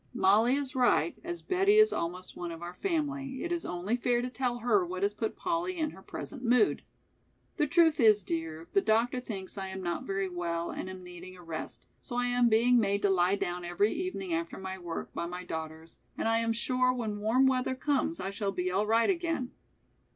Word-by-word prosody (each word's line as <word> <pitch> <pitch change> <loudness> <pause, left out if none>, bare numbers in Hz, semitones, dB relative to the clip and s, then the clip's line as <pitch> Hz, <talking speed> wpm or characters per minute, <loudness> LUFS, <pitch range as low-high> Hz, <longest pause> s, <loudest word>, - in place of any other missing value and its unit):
"Mollie 220 +4 +4
is 275 -2 -3
right, 255 +6 +3
as 345 0 -5
Betty 390 +2 +3
is 430 0 +6
almost 180 +2 -4
one 175 -1 -5
of 165 +1 -8
our 175 +1 -6
family, 280 - -2
it 345 - -3
is 345 -1 -2
only 180 +6 -1
fair 245 0 +1
to 250 - -3
tell 250 -2 -1
her 225 -5 +2
what 185 +2 -4
has 200 +1 +2
put 220 +1 -3
Polly 355 +1 -2
in 310 -2 -1
her - - -13
present 255 - -7
mood. 250 - +3 0.8
The 300 - +2
truth 320 +1 +4
is, 215 -4 +5
dear, 165 -1 -4
the 195 - +4
doctor 230 +4 +2
thinks 200 -5 -6
I 190 - -4
am 190 0 -6
not 175 -1 -2
very 195 0 -1
well 170 -2 -3
and 185 - -5
am 185 -1 -8
needing 180 +1 -10
a 180 - -13
rest, 165 -2 -6 0.2
so 245 - -7
I 245 0 +1
am 245 -1 +3
being 240 +2 +5
made 200 -2 +1
to 200 - +4
lie 180 +1 +3
down 180 -3 -3
every 175 +5 +1
evening 250 - -3
after 165 0 -2
my 190 0 -6
work, 170 -2 -6
by 170 - -3
my 180 +1 -6
daughters, 160 -1 -7 0.2
and - - -1
I 225 0 +3
am 230 0 0
sure 255 +2 +1
when 220 -5 -3
warm 230 +6 +3
weather 260 0 +1
comes 295 +4 0
I 190 - -3
shall 200 -1 -2
be 180 -1 -2
all 200 +3 +1
right 230 +1 +4
again." 335 -8 -1
220 Hz, 215 wpm, -30 LUFS, 180-255 Hz, 0.8 s, is